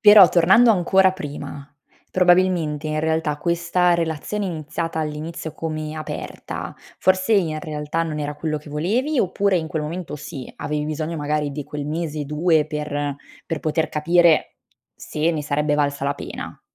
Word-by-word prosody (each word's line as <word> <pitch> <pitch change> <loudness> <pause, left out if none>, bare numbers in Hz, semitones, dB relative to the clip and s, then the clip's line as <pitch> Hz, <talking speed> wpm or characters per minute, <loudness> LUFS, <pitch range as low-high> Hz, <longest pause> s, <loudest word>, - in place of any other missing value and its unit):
Però 205 -4 +9
tornando 190 +8 +6
ancora 190 -1 +4
prima, 145 -4 -7 0.4
probabilmente 175 -4 +3
in 155 0 -1
realtà, 160 -1 0
questa 175 +2 +2
relazione 170 +5 -2
iniziata 165 -1 -3
all'inizio 155 +1 -4
come 155 -1 -4
aperta, 155 -1 -6 0.2
forse 185 +3 +2
in 165 -7 +2
realtà 150 +1 -2
non 155 -2 -4
era 145 0 -3
quello 155 0 -2
che 150 0 -13
volevi? 230 - 0
Oppure 195 -1 +2
in 160 - -1
quel 155 -1 -2
momento 155 0 -5
sì, 135 -2 -8
avevi 150 0 -2
bisogno 155 +2 -3
magari 150 0 -1
di 145 0 -5
quel 145 0 -5
mese 155 -1 -3
2 150 +1 +2
per 145 -2 -3 0.3
per 165 -3 -3
poter 160 +1 0
capire 170 +1 +3 0.4
se 155 +2 -1
ne 155 -3 -2
sarebbe 150 0 0
valsa 145 -1 0
la 140 +1 0
pena? - - -7
155 Hz, 155 wpm, -22 LUFS, 150-175 Hz, 0.4 s, Però